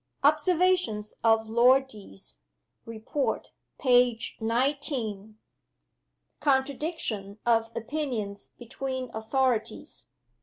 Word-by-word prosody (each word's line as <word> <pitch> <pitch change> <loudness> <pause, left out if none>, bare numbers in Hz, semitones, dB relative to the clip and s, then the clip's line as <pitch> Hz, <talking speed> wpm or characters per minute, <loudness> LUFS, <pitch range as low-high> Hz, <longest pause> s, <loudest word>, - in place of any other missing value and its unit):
Observations 310 - +2
of 225 -1 +3
Lord 250 +4 +5
Deas. 95 - -13 0.5
Report, 230 +5 -3 0.3
page 245 -3 +2
XIX. 230 -4 -1 1.0
Contradiction 265 - -1
of 225 -1 +2
opinions 230 -5 -4
between 260 +1 -5
authorities. 225 0 -1
240 Hz, 70 wpm, -27 LUFS, 220-270 Hz, 1.0 s, Lord